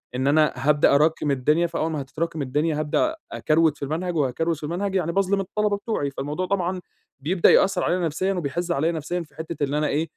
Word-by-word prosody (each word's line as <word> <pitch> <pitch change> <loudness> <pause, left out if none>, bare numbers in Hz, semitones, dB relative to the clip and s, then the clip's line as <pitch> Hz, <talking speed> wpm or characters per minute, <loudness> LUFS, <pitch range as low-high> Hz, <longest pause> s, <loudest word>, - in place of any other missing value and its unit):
إن 130 +2 0
أنا 150 +1 +3
هابدأ 145 +2 +3
اراكم 150 0 +2
الدنيا 150 +6 +2
فأول 160 -1 -2
ما 150 -2 -2
هتتراكم 155 +3 -4
الدنيا 150 +3 0
هابدأ 155 - 0 0.2
اكروِت 155 -1 +2
في - - -8
المنهج، 170 +5 -3
وهاكروِت 155 +4 0
في 150 - -13
المنهج 185 +6 -2
يعني 170 -3 0
باظلم 195 +1 +1
الطلبة 205 +2 -1
بتوعي، 200 -9 -2
فالموضوع 145 +7 -3
طبعًا 185 -1 -1 0.4
بيبدأ 170 +6 +3
يأثر 190 -2 +3
عليَّ 180 - +1
نفسيًا 185 +5 -1
وبيحزّ 175 0 -3
عليَّ 160 +1 +1
نفسيًا 170 +2 -3
في 160 - -13
حتِّة 160 -1 -5
إن 140 - -5
أنا 150 0 +1
إيه، 150 +2 0
160 Hz, 200 wpm, -24 LUFS, 150-180 Hz, 0.4 s, أنا